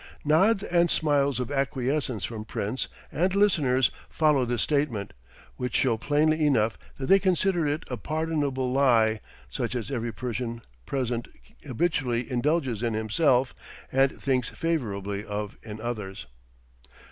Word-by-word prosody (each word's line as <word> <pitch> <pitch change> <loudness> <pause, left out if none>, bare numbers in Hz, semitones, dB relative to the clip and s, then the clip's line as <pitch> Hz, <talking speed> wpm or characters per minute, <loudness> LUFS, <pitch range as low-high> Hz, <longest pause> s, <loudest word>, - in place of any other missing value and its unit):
Nods 195 +8 +4
and 175 -3 +2
smiles 140 -5 +2
of 125 +2 -3
acquiescence 135 - -1
from 110 0 -5
Prince 110 +3 -3 0.2
and 185 +4 +1
listeners 145 -11 +3 0.2
follow 150 -5 +3
this 120 -2 0
statement, 140 -9 -1 0.4
which 125 0 -3
show 125 -4 +3
plainly 155 +6 +2
enough 115 -7 +3 0.2
that 135 - -4
they 195 +7 +6
consider 185 -3 +2
it 145 +2 -1
a 125 - -4
pardonable 145 -1 -1
lie, 115 -5 +3 0.3
such - - -3
as 115 -1 -3
every 120 -3 -2
Persian 120 +1 -4 0.2
present 125 -3 -2 0.4
habitually 130 -3 -1
indulges 130 -3 0
in 115 -2 0
himself 125 +4 +2 0.4
and 135 +1 +2
thinks 130 -3 0
favorably 105 -11 -2
of 105 0 -4
in 110 -1 -8
others. 110 -5 -5
130 Hz, 135 wpm, -27 LUFS, 115-150 Hz, 0.4 s, they